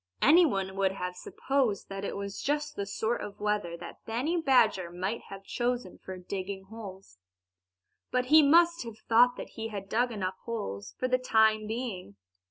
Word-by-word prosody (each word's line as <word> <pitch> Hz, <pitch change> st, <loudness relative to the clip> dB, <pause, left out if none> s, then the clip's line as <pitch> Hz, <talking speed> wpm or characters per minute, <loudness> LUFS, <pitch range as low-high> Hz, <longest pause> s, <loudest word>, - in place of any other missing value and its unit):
Anyone 255 Hz, -, +4 dB
would 190 Hz, -1 st, +2 dB
have 180 Hz, -1 st, -4 dB
supposed 255 Hz, +1 st, -1 dB
that 195 Hz, 0 st, -5 dB
it 200 Hz, -, -3 dB
was 200 Hz, 0 st, -5 dB
just 295 Hz, +1 st, -1 dB
the 200 Hz, -, -3 dB
sort 220 Hz, +4 st, -1 dB
of 200 Hz, -, -7 dB
weather 205 Hz, -5 st, -1 dB
that 170 Hz, -, -10 dB
Benny 250 Hz, +10 st, -1 dB
Badger 220 Hz, -, +3 dB
might 190 Hz, +6 st, -3 dB
have 195 Hz, 0 st, -9 dB
chosen 240 Hz, -2 st, -2 dB
for 190 Hz, 0 st, -8 dB
digging 190 Hz, +1 st, -5 dB
holes. 195 Hz, -, -11 dB, 0.9 s
But 250 Hz, 0 st, +1 dB
he 315 Hz, -, +10 dB
must 335 Hz, +3 st, +5 dB
have 230 Hz, -2 st, -7 dB
thought 245 Hz, +2 st, +5 dB
that -, -, -7 dB
he 225 Hz, -1 st, -5 dB
had 200 Hz, -3 st, -6 dB
dug 245 Hz, +3 st, +1 dB
enough 190 Hz, -3 st, -3 dB
holes 100 Hz, -, -5 dB
for 255 Hz, -, 0 dB
the 255 Hz, 0 st, +2 dB
time 220 Hz, -3 st, +3 dB
being. 220 Hz, -, -5 dB
215 Hz, 175 wpm, -29 LUFS, 190-250 Hz, 0.9 s, he